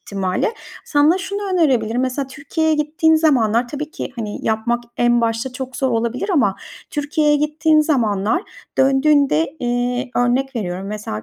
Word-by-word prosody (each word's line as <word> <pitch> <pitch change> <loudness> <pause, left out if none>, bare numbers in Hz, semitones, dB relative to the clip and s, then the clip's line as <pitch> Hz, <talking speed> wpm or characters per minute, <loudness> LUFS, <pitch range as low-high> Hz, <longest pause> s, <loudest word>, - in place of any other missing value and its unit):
ihtimalle. 190 -2 -1 0.4
Sana 300 +5 +3
şunu 400 +1 -4
önerebilirim, 250 -9 +2
mesela 260 +2 -1
Türkiye'ye 300 +4 -1
gittiğin 315 +2 +2
zamanlar 245 -7 +2
tabii 300 +2 -5
ki, - - -6
hani, 210 -3 -4
yapmak 235 +2 0
en 240 0 +3
başta 230 +2 -1
çok 260 0 -6
zor 265 -2 0
olabilir 235 - -1
ama 220 - +2 0.3
Türkiye'ye 295 0 +1
gittiğin 305 +1 +2
zamanlar, 230 - +1 0.4
döndüğünde, 275 - +3
eee, 245 +1 -1
örnek 250 +2 +1
veriyorum, 185 -2 -4
mesela 205 - -5
260 Hz, 140 wpm, -19 LUFS, 230-300 Hz, 0.4 s, Sana